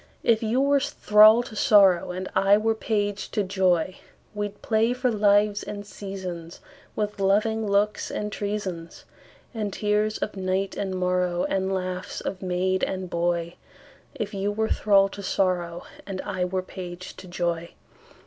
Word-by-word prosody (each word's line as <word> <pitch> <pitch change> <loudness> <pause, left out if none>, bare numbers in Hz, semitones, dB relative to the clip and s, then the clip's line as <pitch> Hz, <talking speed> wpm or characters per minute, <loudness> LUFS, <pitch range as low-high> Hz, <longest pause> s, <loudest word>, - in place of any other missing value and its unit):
If 225 -2 +3
you 230 +4 +1
were 280 0 +3
thrall 215 -1 +5
to 235 - -10
sorrow, 195 -5 +5
And 185 +1 -4
I 200 +1 +5
were 225 +1 +1
page 205 -2 -2
to 210 - +1
joy, 185 -2 +1 0.3
We'd 205 -1 -5
play 225 +2 +2
for 250 0 0
lives 205 -1 +3
and 205 -1 -6
seasonsWith 195 +1 -7
loving 215 +3 +1
looks 205 +1 +1
and 210 0 -4
treasonsAnd 200 -5 -4 0.7
tears 210 +1 0
of 210 - -4
night 190 +1 -1
and 190 -2 -3
morrowAnd 180 +1 0
laughs 185 -1 -3
of 190 - -5
maid 185 0 0
and 185 -1 -3
boy; 170 0 -1 0.6
If 210 -2 -4
you 200 +1 -1
were 220 +1 -1
thrall 200 -2 +4
to 200 - -8
sorrow, 175 -3 -1 0.2
And 195 -2 -5
I 185 -2 -2
were 185 +1 -2
page 180 -1 -8
to 185 - -11
joy. 170 -1 -3
195 Hz, 145 wpm, -25 LUFS, 185-210 Hz, 0.7 s, thrall